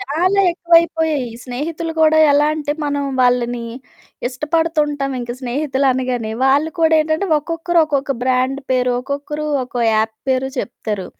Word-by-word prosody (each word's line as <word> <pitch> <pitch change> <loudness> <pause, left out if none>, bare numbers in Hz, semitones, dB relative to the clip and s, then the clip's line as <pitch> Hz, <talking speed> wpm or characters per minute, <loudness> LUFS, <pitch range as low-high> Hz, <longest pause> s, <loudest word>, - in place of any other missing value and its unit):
చాలా 370 +3 +1
ఎక్కువైపోయాయి. 330 -5 +2 0.2
స్నేహితులు 315 +6 -4
కూడా 315 0 +5
ఎలా 290 +1 +4
అంటే, 295 -2 -2
మనం 285 -1 -1 0.2
వాళ్ళని 245 -1 +1 0.6
ఇష్టపడుతుంటాం 300 0 -1
ఇంక 240 0 -5
స్నేహితులనగానే. 255 -3 -1
వాళ్ళు 285 +4 +3
కూడా 320 0 +4
ఏంటంటే, 315 +5 -1
ఒక్కొక్కరు 335 +3 -1
ఒక్కొక్క 280 -2 -1
బ్రాండ్ 260 +2 +1
పేరో, 250 -1 +2
ఒక్కొక్కరు 290 +2 -4 0.2
ఒక్కో 245 -1 -5
యాప్ 220 0 0
పేరు 260 0 +1
చెప్తారు. 210 -5 -4
285 Hz, 125 wpm, -18 LUFS, 255-315 Hz, 0.6 s, కూడా